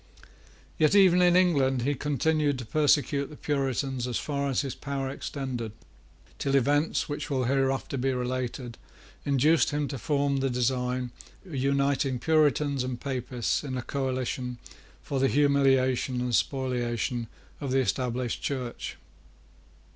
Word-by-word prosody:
Yet 155 +5 +4
even 185 -3 +6
in 175 0 +5
England 140 -9 +3
he 145 +3 +1
continued 145 +1 +1
to 125 - -6
persecute 145 +1 +2
the 150 - -10
Puritans 135 -3 -1
as 125 - -1
far 140 -1 -2
as 135 - +1
his 135 -4 -4
power 135 -2 -4
extended, 130 -6 -4 0.7
till 140 0 0
events 145 +4 +2
which 145 - -4
will 135 -3 0
hereafter 135 +1 0
be 135 +2 +1
related 125 -1 -3 0.5
induced 145 +4 +4
him 145 0 -1
to 135 - -5
form 140 +2 +1
the 135 0 0
design 125 0 -1 0.3
of 175 - -11
uniting 140 0 +1
Puritans 145 -1 +2
and 125 -1 -4
Papists 125 -2 -2
in 130 -3 -4
a 125 - -3
coalition 130 -2 -2 0.5
for 140 - -2
the 135 - +4
humiliation 135 -3 +2
and 125 0 -2
spoliation 120 -2 -1 0.3
of 140 - -4
the 130 - +2
established 125 0 -1
Church. 125 -4 -4
135 Hz, 140 wpm, -28 LUFS, 125-145 Hz, 0.7 s, even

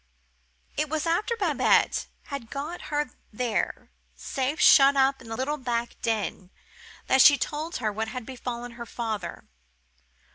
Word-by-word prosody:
It 305 0 0
was 310 +1 -1
after 415 +8 0
Babette 340 - +2 0.2
had 275 -6 -7
got 300 +6 -6
her 295 -3 -1 0.2
there, 230 0 -2 0.2
safe 270 +3 -3
shut 280 -1 +7
up 270 0 +3
in 230 - -12
the 225 - -4
little 290 +4 -1
back 240 -3 -2
den, 210 -4 -2 0.6
that 265 - +4
she 285 +2 +8
told 305 +5 -3
her 220 -4 -1
what 220 +2 -2
had 235 +1 -6
befallen 245 -1 -6
her 235 0 -9
father. 225 -3 -4
265 Hz, 145 wpm, -26 LUFS, 235-295 Hz, 0.6 s, she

